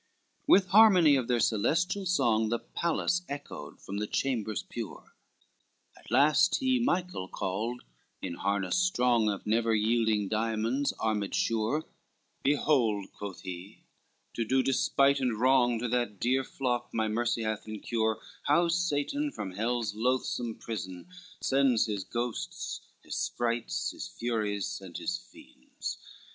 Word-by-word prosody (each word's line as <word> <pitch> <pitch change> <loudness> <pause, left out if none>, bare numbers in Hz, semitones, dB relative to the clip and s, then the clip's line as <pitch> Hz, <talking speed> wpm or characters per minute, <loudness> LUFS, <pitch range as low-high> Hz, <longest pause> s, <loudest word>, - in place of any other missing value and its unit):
LVIII - - -43
With 195 -10 +6
harmony 185 -7 +7
of 130 -3 0
their 120 -1 +2
celestial 180 - +1
song 115 -10 +2
The 120 - +1
palace 170 +6 -1
echoed 140 - -7
from 100 - -6
the 105 +1 -2
chambers 110 -6 -1
pure, - - -8 0.8
At - - -16
last 150 +8 +4
he 260 -1 +2
Michael 180 - -1
called, 110 +7 -3 0.4
in - - -4
harness 100 - 0
strong 125 -11 +3
Of 100 -2 -4
never 115 +1 +2
yielding 110 -1 +2
diamonds 115 +5 0
armed 105 -3 -1
sure, 115 +8 0 0.6
"Behold," 125 -8 +2
quoth 100 -2 -7
he, 90 +3 -8 0.5
"to 115 - -1
do 130 +4 +2
despite 140 +1 +3
and 125 -5 -1
wrong 125 -1 +4
To 120 +2 -2
that 120 -5 -1
dear 130 +2 +2
flock 125 -2 -2
my 110 -1 0
mercy 115 +1 0
hath 110 0 -3
in 110 -1 -5
cure, 110 -1 0 0.2
How 170 +4 +3
Satan 175 - 0
from 95 - -5
hell's 115 +2 -1
loathsome 120 0 -1
prison 95 - -6 0.3
sends 135 -4 +3
His 105 -3 -3
ghosts, 120 - -4 0.2
his - - -6
sprites, 115 - -1
his - - -7
furies 105 -5 -2
and 90 -3 -8
his 180 -1 -2
fiends. 295 - -9
120 Hz, 140 wpm, -29 LUFS, 110-145 Hz, 0.8 s, harmony